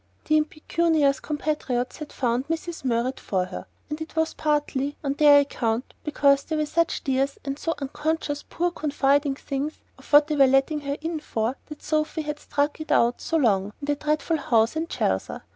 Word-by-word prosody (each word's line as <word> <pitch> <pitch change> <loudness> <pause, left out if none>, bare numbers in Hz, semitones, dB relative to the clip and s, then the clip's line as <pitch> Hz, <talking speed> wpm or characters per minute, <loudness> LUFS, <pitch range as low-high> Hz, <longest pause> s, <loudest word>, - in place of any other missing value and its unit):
The 310 - +3
impecunious 305 -1 +1
compatriots 285 -5 -2
had 305 -1 -8
found 245 +1 -1
Mrs. 330 0 -4
Murrett 250 +1 0
for 185 -2 -1
her, 185 - -8 0.2
and 300 +1 -5
it 320 - -7
was 320 0 +1
partly 295 -2 -1
on 275 -1 0
their 290 0 +7
account 235 -4 -2
(because 280 -2 +3
they 315 - -3
were 305 0 +1
such 335 +2 0
dears, 270 +1 0
and 275 +1 -3
so 330 - -1
unconscious, 295 +1 -2
poor 350 +1 0
confiding 285 -2 +1
things, 280 +2 -3 0.3
of - - -17
what 295 0 +8
they 305 0 -2
were 275 -2 +6
letting 270 +3 +2
her 280 0 -3
in 325 0 -3
for) 230 -3 -2
that 300 -1 -10
Sophy 310 +1 -1
had 300 0 -4
stuck 290 +2 -1
it 310 - -6
out 235 +1 +3
so 330 - 0
long 205 -7 +2
in 285 - -6
the 290 0 +1
dreadful 305 +2 0
house 230 -2 +2
in 320 +1 -1
Chelsea. - - -1
290 Hz, 190 wpm, -25 LUFS, 270-310 Hz, 0.3 s, what